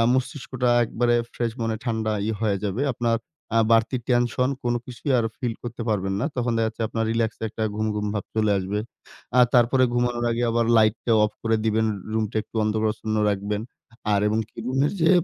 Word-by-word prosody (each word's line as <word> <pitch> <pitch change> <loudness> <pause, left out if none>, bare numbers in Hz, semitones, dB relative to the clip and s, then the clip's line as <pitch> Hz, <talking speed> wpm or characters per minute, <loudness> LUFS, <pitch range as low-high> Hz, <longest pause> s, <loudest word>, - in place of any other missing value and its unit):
মস্তিষ্কটা 130 -1 -1 0.2
একবারে 120 +1 +1 0.2
ফ্রেশ 120 -2 -2
মনে 115 -1 -1
ঠান্ডা 110 -3 -1
ই - - 0
হয়ে 105 -3 +1
যাবে। 105 +6 -1
আপনার, 115 -1 +1 0.4
আ - - +6
বাড়তি 115 +3 +3
টেনশন 120 +1 +2
কোন 120 0 +1
কিছুই 130 +3 -3
আর 115 - +1
ফিল 120 -4 -2
করতে 120 0 -5
পারবেন 95 -3 0
না। - - 0
তখন 120 -1 0
দেখাযাচ্ছে 110 0 -1
আপনার 115 0 -1
রিল্যাক্স 115 -1 0
একটা 110 +1 -5
ঘুম, 110 0 0
ঘুম, 105 0 -2
ভাব 105 - -2
চলে 110 -1 +2
আসবে। 95 +2 -2 0.6
আ - - +9
তারপরে 125 +2 +5
ঘুমানোর 120 0 0
আগে 115 +1 -1
আবার 115 0 +1
লাইটটা 110 +2 +2
অফ 105 - -1
করে 115 0 +2
দিবেন। 110 0 +2 0.3
রুমটা 110 -1 -1
একটু - - -33
অন্ধকারাচ্ছন্ন 110 0 -1
রাখবেন। 100 +1 -2 0.5
আর 100 - +3
এবং 110 +1 +1
কি - - -20
রুমের 135 +3 +1
যে 165 - +5
115 Hz, 185 wpm, -24 LUFS, 110-120 Hz, 0.6 s, আ